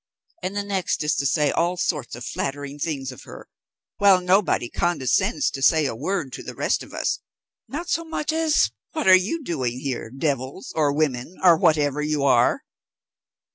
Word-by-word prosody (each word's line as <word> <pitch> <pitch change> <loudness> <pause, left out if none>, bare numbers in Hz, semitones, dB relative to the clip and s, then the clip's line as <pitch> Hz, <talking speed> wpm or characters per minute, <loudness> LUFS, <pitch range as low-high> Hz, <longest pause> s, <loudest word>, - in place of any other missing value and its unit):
and 190 +2 -4
the 205 - -1
next 195 -5 -1
is 150 +2 +1
to 140 - +1
say 150 +1 +2
all 175 +2 0
sorts 150 -9 -2
of 120 0 -8
flattering 145 +2 -4
things 140 -4 -3
of 125 - -12
her, - - -12 0.5
while 200 -2 +6
nobody 180 -7 +2
condescends 175 - 0
to 135 - -6
say 155 +2 +4
a 125 - -2
word 140 - -3
to - - -6
the - - -8
rest - - 0
of - - -11
us, - - -1 0.5
not 335 +5 -5
so 335 -2 0
much 315 -1 -3
as 320 -1 +2 0.2
'What 310 - -2
are 190 - +9
you 200 - +2
doing 130 - -2
here, 130 -4 -4
devils, 135 +4 -3
or 150 -3 +2
women, 145 +1 -1
or 175 -2 +8
whatever 150 -2 +2
you 150 -1 -1
are?'" 125 -3 +3
155 Hz, 180 wpm, -23 LUFS, 135-190 Hz, 0.5 s, are